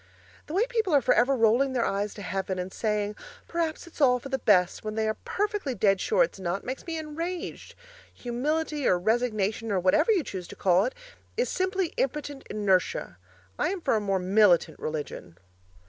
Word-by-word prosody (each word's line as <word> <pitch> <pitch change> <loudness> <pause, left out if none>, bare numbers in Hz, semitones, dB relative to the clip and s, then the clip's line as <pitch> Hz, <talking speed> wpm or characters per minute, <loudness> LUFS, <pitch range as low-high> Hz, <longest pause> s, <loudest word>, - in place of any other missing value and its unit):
The 310 - -5
way 420 +5 +3
people 445 -9 +1
are 280 - +5
for - - +4
ever 260 +3 +3
rolling 240 +4 +3
their 240 -3 +1
eyes 200 +1 -2
to 205 - -8
heaven 190 0 -2
and 180 +1 -4
saying, 210 -1 -1 0.3
'Perhaps 335 -1 -2
it's 340 -2 -11
all 250 -3 +5
for 260 +3 -9
the 265 -1 -1
best,' 180 -6 +3
when 215 0 -4
they 220 0 0
are 215 - +1
perfectly 400 - -2
dead 195 -2 +2
sure 485 +3 +3
it's - - -4
not, 185 +1 -2
makes 260 +6 -6
me 330 -1 -3
enraged. 330 +3 -5 0.4
Humility 295 +4 -2
or 180 - +4
resignation 220 +1 0
or 195 - +2
whatever 190 - +3
you 380 -7 +2
choose 185 -7 -6
to - - -10
call 185 +1 +3
it, 255 - -3 0.4
is 485 - +1
simply 375 -2 -1
impotent 285 0 -2
inertia. 190 - 0 0.4
I'm 380 +3 0
for 320 - +1
a 215 - +1
more 195 -2 0
militant 185 -4 +3
religion! 145 - -5
235 Hz, 190 wpm, -27 LUFS, 195-310 Hz, 0.4 s, are